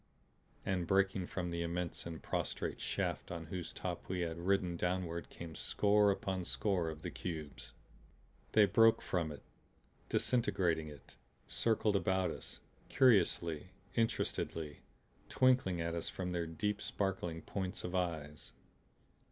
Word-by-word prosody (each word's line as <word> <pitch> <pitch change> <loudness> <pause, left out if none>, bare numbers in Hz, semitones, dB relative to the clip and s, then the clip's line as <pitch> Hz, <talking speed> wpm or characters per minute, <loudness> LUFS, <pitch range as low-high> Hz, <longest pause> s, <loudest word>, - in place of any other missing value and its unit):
And 90 -3 0
breaking 95 -1 +2
from 90 -2 -3
the 85 0 -2
immense 85 0 -3
and 80 -2 -7
prostrate - - -2
shaft - - -2
on 85 -1 -5
whose 85 +1 -4
top - - -5
we 90 -1 -1
had 85 -1 -2
ridden 90 -1 +1
downward 85 -2 -1
came 85 -2 -8
score 105 +4 +3
upon 95 -1 -1
score 90 -2 0
of 80 0 -8
the 90 - -3
cubes. 75 -8 -6 0.8
They 105 -1 +8
broke 115 +4 +6
from 85 -4 0
it, 75 - -9 0.7
disintegrating 90 -10 +2
it; 75 -2 -12 0.3
circled 110 -2 +1
about 95 -1 +2
us, - - -8 0.3
curiously, 90 - +3 0.2
interestedly, 80 -8 -1 0.5
twinkling 130 -9 +3
at 85 0 -1
us 85 - -2
from 90 -1 -3
their 85 -2 -1
deep 105 +6 -1
sparkling 90 -5 -2
points 95 -2 -3
of 90 - -4
eyes. 80 -5 -2
90 Hz, 135 wpm, -35 LUFS, 85-95 Hz, 0.8 s, They